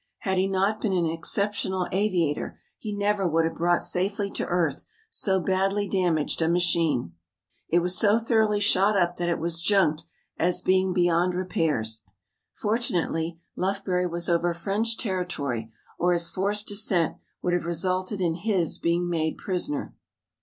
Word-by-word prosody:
Had 190 -3 0
he 190 - +2
not 195 +3 0
been 205 -4 0
an 175 -2 +2
exceptional 185 +3 -1
aviator 180 -6 0 0.2
he 215 - -5
never 205 -1 +1
would 165 0 +2
have 165 - -1
brought 175 +1 +1
safely 200 +2 -1
to - - -2
earth 170 -6 0 0.3
so 195 - +1
badly 195 +3 0
damaged 175 -6 0
a 160 - +3
machine. 165 - +1 0.6
It 170 +1 +3
was 180 +1 +2
so 210 +1 +4
thoroughly 220 -2 +2
shot 205 0 +3
up 175 -1 +1
that 175 0 -1
it 170 - +1
was 165 0 0
junked 170 -5 +2 0.3
as 175 +2 +2
being 185 0 +2
beyond 175 0 +2
repairs. 150 -12 -1 0.5
Fortunately 175 -7 -1 0.2
Lufbery 185 -1 0
was 170 0 -3
over 170 0 +1
French 210 +6 -1
territory 145 - -3 0.3
or 180 +1 +3
his 170 -1 0
forced 205 +2 0
descent 200 -5 0 0.3
would 175 - +1
have 175 -1 0
resulted 185 +3 -1
in 170 -2 +1
his 180 -1 -1
being 170 +1 +1
made 160 -2 -1
prisoner. 180 -6 -2
180 Hz, 155 wpm, -26 LUFS, 170-200 Hz, 0.6 s, so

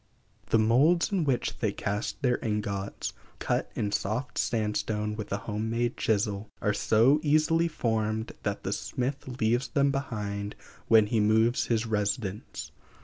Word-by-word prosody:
The - - +4
moulds 135 - +4
in 185 -5 +1
which 130 -4 -1
they 110 -4 +1
cast 105 +7 -3
their 125 -2 +2
ingots, 105 -2 -2 0.2
cut - - -1
in 105 - -1
soft 110 +7 -2
sandstone 105 -1 -1
with 105 -1 -6
a 100 - +1
home 105 +2 -3
made 120 +1 0
chisel, 105 -1 0
are 105 - +1
so 120 +9 +4
easily 155 +2 +3
formed 110 -6 -1
that - - -3
the - - -1
smith 130 +3 -3
leaves 120 +4 +2
them 140 -1 +2
behind 105 -7 -3 0.3
when 110 -2 +6
he 110 +2 0
moves 110 +3 +3
his 115 -1 +1
residence. 105 -1 -2
110 Hz, 145 wpm, -28 LUFS, 105-125 Hz, 0.3 s, when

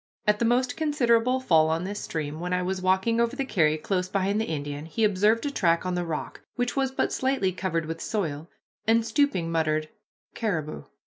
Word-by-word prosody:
At 210 -1 +3
the 235 - +2
most 250 +2 +2
considerable 255 -5 +2
fall 160 -11 +4
on 165 +2 0
this 205 +2 -4
stream, 155 -1 -4
when 180 +1 -3
I 180 0 +1
was 185 +1 -2
walking 190 +5 +2
over 235 +2 0
the 275 -1 -2
carry 155 -10 +2
close 180 +3 -2
behind 200 +2 0
the - - -1
Indian, 145 -1 -4
he 225 +7 -2
observed 210 +4 +3
a 285 - -1
track 170 -8 +2
on 185 - -1
the 175 0 -1
rock, 160 -3 -5
which 245 -1 -1
was 270 -1 +1
but 265 - -1
slightly 260 -8 +1
covered 180 -3 -2
with 165 +1 -5
soil, 165 -6 -3 0.4
and, 225 0 +4
stooping, 220 - +1
muttered, 155 -1 0 0.4
"Caribou." 165 -10 -3
190 Hz, 200 wpm, -26 LUFS, 165-230 Hz, 0.4 s, fall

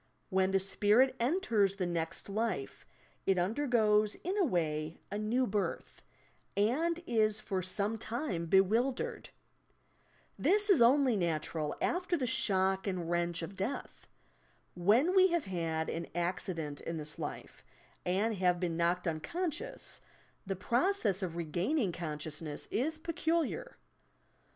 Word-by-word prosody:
When 190 0 +3
the 195 0 +3
spirit 210 +7 +3
enters 235 - +2
the 190 -2 -1
next 165 -2 -3
life, 200 -10 -3 0.4
it 195 -1 +3
undergoes 215 0 +2
in 370 +3 -1
a 410 - +3
way 160 - -1
a 205 - -2
"new 235 +5 +1
birth," 205 -2 -3 0.6
and 325 +12 +1
is 215 -4 +2
for 190 -3 -2
some 200 +4 -2
time 220 - -3
bewildered. 235 - +2 1.1
This 410 +1 +3
is 340 - +5
only 255 0 +5
natural 160 -4 -1
after 360 0 0
the 265 - -1
■ - - -2
shodt 190 -5 +1
and 175 -3 -2
wrench 170 -1 0
of 185 +4 -7
death. 200 +9 -5 0.7
When 220 - +3
we 375 0 +7
have 340 -4 0
had 165 -3 -2
an 170 - -3
accident 170 -4 -2
in 165 - -4
this 155 0 -5
life, - - -7 0.4
and 200 +5 +1
have 180 -1 +2
been 170 -2 -1
knocked 175 +2 +1
unconscious, 305 - -4 0.5
the 195 - -1
process 235 - +1
of 175 -3 -3
regaining 175 - 0
consciousness 155 -2 -5
is 310 +8 0
peculiar. 335 +7 -1
195 Hz, 130 wpm, -32 LUFS, 175-255 Hz, 1.1 s, we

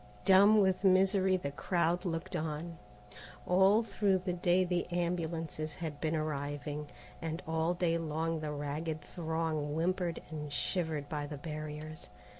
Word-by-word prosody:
Dumb 200 +2 +7
with 190 -1 +2
misery 190 0 +4
the 140 -6 -4
crowd 175 +3 0
looked 165 -1 -3
on. 160 +2 -3 0.7
All 190 +5 +5
through 200 -2 +2
the 185 -1 -2
day 175 +1 +3
the 180 -1 0
ambulances 165 -3 -2
had 155 -4 -5
been 160 0 0
arriving, 145 -1 -3 0.3
and 160 +1 -3
all 160 +2 +1
day 170 -1 +1
long 165 0 -1
the 155 -1 -3
ragged 150 +2 -3
throng 160 -3 -2
whimpered 175 +1 0
and 150 -2 -5
shivered 160 -2 -1
by 145 -1 -3
the 145 0 -6
barriers. 155 0 -6
165 Hz, 140 wpm, -33 LUFS, 155-180 Hz, 0.7 s, Dumb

